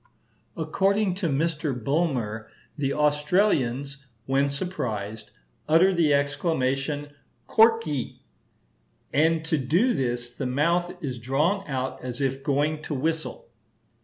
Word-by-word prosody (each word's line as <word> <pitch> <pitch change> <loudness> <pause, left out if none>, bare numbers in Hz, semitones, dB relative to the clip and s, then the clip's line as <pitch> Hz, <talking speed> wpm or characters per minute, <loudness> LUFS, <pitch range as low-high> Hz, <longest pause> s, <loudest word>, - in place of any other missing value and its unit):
According 195 +5 +1
to 170 - +1
Mr. 150 +1 0
Bulmer 125 -5 -1 0.3
the 140 -3 -1
Australians, 150 - +1 0.3
when 135 +1 +2
surprised, 110 - -4 0.4
utter 175 +5 +5
the 165 -4 +3
exclamation 140 0 0 0.4
korki, 220 - +2 0.9
"and 160 +2 +2
to 160 -2 +1
do 175 - +2
this 120 -2 -2
the 130 +1 -4
mouth 170 +7 +1
is 130 -4 -3
drawn 150 - 0
out 130 -2 -3
as 125 -1 -5
if 135 -1 -1
going 150 +2 0
to 150 - -4
whistle." 160 - -3
145 Hz, 110 wpm, -26 LUFS, 130-165 Hz, 0.9 s, utter